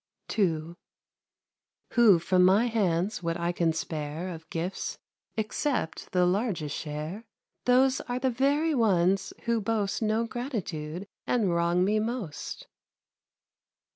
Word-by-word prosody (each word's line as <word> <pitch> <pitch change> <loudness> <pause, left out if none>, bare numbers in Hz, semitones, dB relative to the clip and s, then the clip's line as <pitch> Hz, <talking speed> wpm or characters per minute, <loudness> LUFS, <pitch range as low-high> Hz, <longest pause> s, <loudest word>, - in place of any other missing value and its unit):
II 170 -5 +1 1.2
Who 230 -7 +6
from 180 +2 +3
my 195 +6 +5
hands 205 -4 0
what 170 -1 -2
I 170 +1 0
can 170 -2 +1
spare 160 +2 -4
Of 160 -2 -9
gifts 170 +3 -3 0.4
accept 220 - -2
the 180 -1 +3
largest 180 - 0
share, 155 +7 -5 0.4
Those 255 +1 +4
are 245 - 0
the 260 0 +1
very 285 +6 +2
ones 195 -5 +2
who 235 -1 +1
boast 210 -1 -1
No 220 +1 +1
gratitude 200 - -4 0.2
and 210 -8 +2
wrong 170 +1 +2
me 210 +2 +2
most. 220 -7 -4
195 Hz, 120 wpm, -28 LUFS, 170-230 Hz, 1.2 s, Who